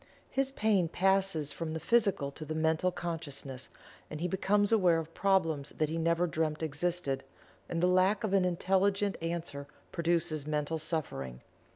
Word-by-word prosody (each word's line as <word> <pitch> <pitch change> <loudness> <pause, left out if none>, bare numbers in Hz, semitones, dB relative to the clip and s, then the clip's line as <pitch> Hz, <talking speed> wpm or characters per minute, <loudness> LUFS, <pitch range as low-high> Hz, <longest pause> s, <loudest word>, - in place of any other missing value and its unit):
His 270 0 +1
pain 210 -8 +2
passes 190 -4 +2
from 160 +1 -4
the 160 - -3
Physical 195 -7 +2
to 155 - -8
the 155 +1 -4
Mental 160 +3 +2
consciousness, 145 -7 -5 0.4
and 155 - -6
he 175 - 0
becomes 205 +3 +2
aware 185 -7 +4
of 165 0 -5
problems 165 -7 +1
that 155 -1 +1
he 165 +1 -2
never 170 +1 +2
dreamt 160 -2 -1
existed, 160 -2 -1 0.5
and 170 0 -1
the - - +5
lack 185 +5 +3
of 205 -3 -1
an 195 -2 +4
intelligent 195 +3 +1
answer 165 -4 -4 0.2
produces 165 -3 0
mental 150 +1 -1
suffering. 100 - -3
170 Hz, 160 wpm, -31 LUFS, 155-190 Hz, 0.5 s, the